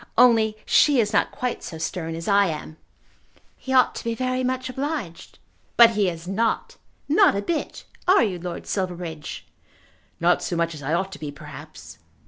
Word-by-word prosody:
Only 225 -3 +5
she 290 -4 +4
is 215 -1 +1
not 205 - +3
quite 250 -4 -3
so 165 - -7
stern 160 0 -4
as 165 +1 -6
I 200 -1 +4
am." 155 -1 -6 0.8
"He 265 - -8
ought 255 -1 +4
to - - -7
be 230 -1 -2
very 255 +1 -1
much 255 0 -1
obliged." 265 - -5 0.4
"But 235 -1 +9
he 205 -4 +1
is 170 0 -8
not, 220 +4 -1 0.3
not 355 - +5
a 200 - 0
bit. 320 +7 -3 0.2
Are 370 -7 +6
you, 190 -6 -2
Lord 175 0 -6
Silverbridge?" 170 - -4 0.7
"Not 175 +1 +3
so 175 - -3
much 170 0 0
as 150 - -9
I 145 +4 -1
ought 190 +2 -2
to - - -9
be, 150 - -5
perhaps." 145 - -11
195 Hz, 180 wpm, -24 LUFS, 165-250 Hz, 0.8 s, But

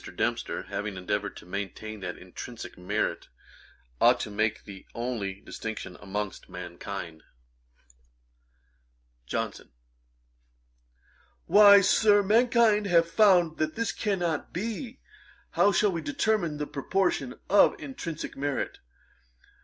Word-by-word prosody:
Dempster - - -2
having 100 -2 -5
endeavoured 105 +2 -3
to - - -12
maintain 100 +3 -6
that 90 -2 -5
intrinsick 110 +6 -9
merit 90 - -2 0.7
ought - - +6
to - - -4
make 110 +2 -1
the 100 -2 -11
only 110 -5 -3
distinction 110 -5 -6
amongst 105 0 -5
mankind. 85 -2 -7 2.1
JOHNSON. - - -4 1.8
'Why, 205 -1 +8
Sir, 205 +1 +4
mankind 225 -1 +4
have 170 -2 +4
found 180 -7 +4
that 155 0 -1
this 230 0 -1
cannot 175 -7 -2
be. 230 - -5 0.5
How 205 - +4
shall 200 +2 +3
we 170 -2 -3
determine 215 - 0
the 150 - -2
proportion 145 -2 -1
of 205 - +5
intrinsick 170 - -6
merit? 140 0 -3
155 Hz, 105 wpm, -28 LUFS, -, 2.1 s, Why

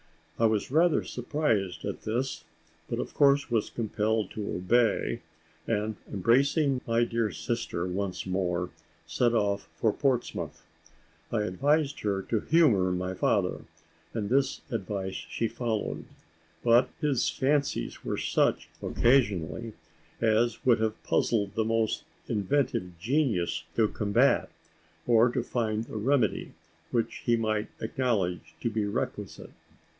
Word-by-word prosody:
I 115 - +4
was 110 +2 0
rather 165 +2 +4
surprised 115 - -1
at - - -4
this, 125 +5 -2 0.5
but - - -2
of - - -4
course 140 -2 +4
was 115 -3 +1
compelled 110 -2 -1
to 105 -2 -4
obey 115 +6 +2 0.5
and, 110 -1 -1
embracing 135 - +2
my 115 0 +3
dear 115 -2 0
sister 95 -1 -3
once 95 +1 -3
more, 90 -2 -1 0.3
set 120 -1 +1
off 100 -2 0
for 110 -2 +1
Portsmouth. 130 -4 -1 0.7
I 110 -2 +1
advised 140 - +1
her 100 -2 -1
to 110 - 0
humour 110 - +4
my 90 +1 -2
father, - - 0 0.5
and 105 -1 -2
this 135 0 +2
advice 95 -3 -3
she 115 - -3
followed; 110 -2 -3 0.6
but 120 +1 +5
his 140 -6 +1
fancies 140 +1 0
were - - -2
such, - - +1
occasionally, 115 -3 +1 0.5
as 115 +1 +2
would 120 -3 +5
have 110 0 -1
puzzled 100 -4 +1
the 110 - +1
most 115 0 0 0.2
inventive 100 -5 0
genius 110 - 0
to 110 -2 +4
combat, 115 +6 +2 0.6
or 120 0 +5
to 120 0 -1
find 110 -3 -1
the 115 - -7
remedy 130 +5 +1 0.4
which 115 -2 -1
he 120 - +4
might 110 -1 0
acknowledge 110 -7 -1
to 115 - 0
be 110 -1 0
requisite. 100 - -4
115 Hz, 130 wpm, -28 LUFS, 100-125 Hz, 0.7 s, but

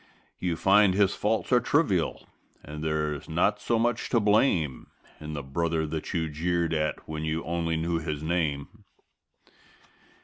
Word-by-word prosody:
You 90 -2 -1
find 95 +2 +4
his 100 -1 +3
faults 110 +4 -1
are 125 - +6
trivial 120 - 0 0.4
and 75 +1 -7
there's 75 -2 -2
not - - +1
so 115 - +1
much 120 0 0
to 120 - +3
blame 105 - +2 0.3
In 75 0 -7
the 70 -2 -4
brother 80 +3 -1
that 80 0 -4
you 80 -3 -1
jeered 85 +2 -1
at 75 -1 -2
when 80 0 -4
you 80 +1 -2
only 85 -1 -1
knew 85 +1 -1
his 75 -2 -4
name. 85 +4 -2
85 Hz, 150 wpm, -27 LUFS, 75-100 Hz, 0.4 s, are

